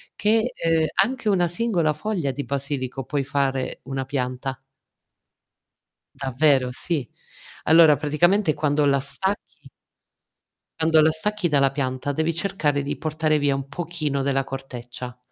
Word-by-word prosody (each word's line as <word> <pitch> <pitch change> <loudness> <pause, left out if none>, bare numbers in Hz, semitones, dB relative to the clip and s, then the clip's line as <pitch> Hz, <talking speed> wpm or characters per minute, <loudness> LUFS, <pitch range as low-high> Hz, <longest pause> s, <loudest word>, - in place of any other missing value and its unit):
che, 220 +3 +2
ehm, 165 -1 +1 0.2
anche 240 +2 0
una 180 -3 +3
singola 175 -4 0
foglia 160 -3 -2
di 145 - -5
basilico 135 -2 -3
puoi 145 +1 -1
fare 135 -2 -1
una 135 0 -4
pianta. 130 0 -3 1.6
Davvero 135 -1 +2
sì. 145 -1 -3 0.6
Allora 160 -1 +7
praticamente 155 +5 +2
quando 150 -1 +1
la 140 -1 +3
stacchi 190 +9 -4 1.1
quando 160 -1 +5
la 155 +1 +4
stacchi 210 +4 -1
dalla 140 -4 +3
pianta, 135 0 -2
devi 160 +3 0
cercare 160 -5 0
di 140 - -4
portare 155 0 0
via 145 -1 +1
un 135 0 -5
pochino 155 -2 -2
della 135 0 +1
corteccia, 125 -2 -7
145 Hz, 130 wpm, -23 LUFS, 135-165 Hz, 1.6 s, Allora